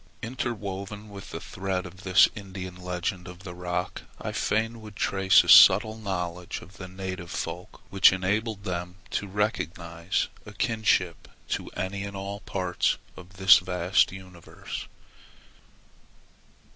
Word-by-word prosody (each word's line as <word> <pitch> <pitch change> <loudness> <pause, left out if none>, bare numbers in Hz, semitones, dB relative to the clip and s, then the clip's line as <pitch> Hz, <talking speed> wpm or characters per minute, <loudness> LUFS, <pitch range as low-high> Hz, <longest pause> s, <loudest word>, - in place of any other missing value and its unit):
Interwoven 105 -4 -4
with 100 -2 -10
the - - -5
thread 95 -1 -3
of 90 +1 -10
this 95 0 +6
Indian 95 -3 -7
legend 90 +1 -4
of 90 +1 -11
the 90 -2 -7
rock, 90 0 -3 0.2
I - - -4
fain 115 +1 -1
would 105 -1 -11
trace 95 -1 +4
a - - -9
subtle 110 0 +8
knowledge 90 -5 -4
of 95 - -15
the 95 - -7
native 95 -2 -6
folk 90 +4 -6
which 95 0 +7
enabled 100 +3 -1
them 90 -2 -4 0.2
to 100 - -2
recognize 85 -4 -2 0.2
a 105 - -11
kinship 105 - 0 0.2
to - - -2
any 95 +2 -3
and 100 -1 -6
all 100 +1 -5
parts 90 -4 -1 0.2
of 90 +1 -13
this 95 0 +7
vast 90 +1 +2
universe. 95 -3 -9
95 Hz, 135 wpm, -27 LUFS, 90-100 Hz, 0.2 s, subtle